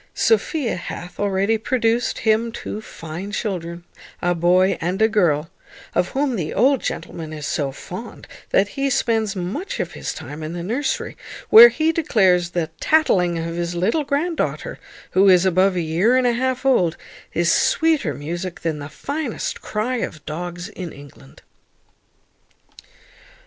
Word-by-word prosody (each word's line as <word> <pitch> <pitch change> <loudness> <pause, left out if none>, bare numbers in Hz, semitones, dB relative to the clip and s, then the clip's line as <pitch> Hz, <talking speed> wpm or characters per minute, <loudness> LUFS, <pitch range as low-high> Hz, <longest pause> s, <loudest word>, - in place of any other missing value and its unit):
Sophia 320 - +1
hath 175 0 -8
already 200 +2 +1
produced 235 0 0
him 225 +1 +2
two 215 -2 -6
fine 170 +1 -8
children, 175 -5 -4 0.4
a 175 0 +1
boy 180 +3 +3
and 180 +4 -1
a 220 - +5
girl, 165 -8 +1 0.4
of - - +1
whom 275 -2 -1
the 165 -7 -3
old 260 +4 +3
gentleman 160 -2 -5
is 150 -2 -6
so 140 -2 -1
fond, 185 - -9 0.2
that 200 +1 +3
he 275 +4 -1
spends 220 -4 0
much 280 - -4
of - - -2
his - - -5
time 150 +2 -8
in 155 +1 -5
the 175 -1 -5
nursery, 255 +9 -2 0.4
where 460 +2 +11
he 320 -5 +1
declares 190 - +2
the 170 -2 -2
tattling 185 - +3
of 165 0 -3
his 175 0 -3
little 220 - +1
grand 300 +4 -1
daughter, - - -3 0.3
who 195 +1 +5
is 180 0 +5
above 185 +1 +3
a 175 - 0
year 170 +10 +2
and 255 - +2
a 240 - +3
half 260 +2 -1
old, 180 -11 +3 0.4
is 170 0 +2
sweeter 315 - +2
music 170 +5 -5
than 160 -3 -2
the 145 0 -7
finest 280 - -4
cry 230 +4 -2
of 155 -10 -5
dogs 175 +3 -5
in 180 -4 -7
England. 140 -1 -15
190 Hz, 155 wpm, -21 LUFS, 170-245 Hz, 0.4 s, where